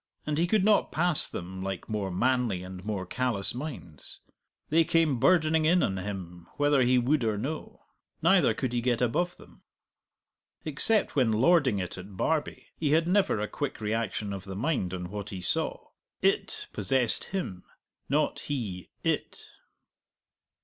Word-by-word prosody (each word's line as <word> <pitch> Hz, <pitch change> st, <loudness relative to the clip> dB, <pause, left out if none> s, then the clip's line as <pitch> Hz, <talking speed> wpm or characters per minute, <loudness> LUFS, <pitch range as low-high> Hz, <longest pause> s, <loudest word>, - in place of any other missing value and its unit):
And 150 Hz, 0 st, -1 dB
he 170 Hz, -, +2 dB
could 200 Hz, 0 st, +2 dB
not 215 Hz, -1 st, +3 dB
pass 175 Hz, -1 st, +4 dB
them 95 Hz, +1 st, -6 dB
like 95 Hz, -1 st, -4 dB
more 105 Hz, -3 st, -2 dB
manly 120 Hz, -1 st, 0 dB
and 90 Hz, 0 st, -9 dB
more 100 Hz, -3 st, -3 dB
callous 115 Hz, -1 st, 0 dB
minds; 105 Hz, -, -7 dB, 0.5 s
they 165 Hz, +2 st, +5 dB
came 160 Hz, -5 st, +2 dB
burdening 160 Hz, 0 st, +3 dB
in 175 Hz, +3 st, +4 dB
on 95 Hz, -, 0 dB
him 90 Hz, -3 st, -6 dB
whether 145 Hz, -2 st, +3 dB
he 125 Hz, 0 st, +4 dB
would 130 Hz, +3 st, +2 dB
or 110 Hz, -2 st, 0 dB
no. 145 Hz, +9 st, -5 dB, 0.4 s
Neither -, -, +4 dB
could 130 Hz, -2 st, -2 dB
he 120 Hz, -, 0 dB
get 120 Hz, -1 st, +1 dB
above 175 Hz, +9 st, 0 dB
them. -, -, -18 dB, 1.0 s
Except 180 Hz, +8 st, +2 dB
when 125 Hz, -5 st, +3 dB
lording 130 Hz, -, +4 dB
it 90 Hz, -1 st, -4 dB
at 95 Hz, +1 st, -10 dB
Barbie, 155 Hz, -, -1 dB
he 150 Hz, -2 st, +1 dB
had 165 Hz, +1 st, +3 dB
never 185 Hz, -, +2 dB
a 105 Hz, -, -1 dB
quick 145 Hz, 0 st, -4 dB
reaction 110 Hz, -1 st, -2 dB
of 95 Hz, -2 st, -6 dB
the 95 Hz, -1 st, -6 dB
mind 115 Hz, -, -1 dB
on 90 Hz, -1 st, -5 dB
what 105 Hz, 0 st, -5 dB
he 95 Hz, -, -6 dB
saw; 90 Hz, -, -1 dB, 0.3 s
it -, -, +1 dB
possessed 120 Hz, +4 st, +1 dB
him, 180 Hz, -, -4 dB, 0.5 s
not 150 Hz, +3 st, +1 dB
he 105 Hz, -, -4 dB
it. -, -, -2 dB
120 Hz, 160 wpm, -28 LUFS, 95-155 Hz, 1.0 s, they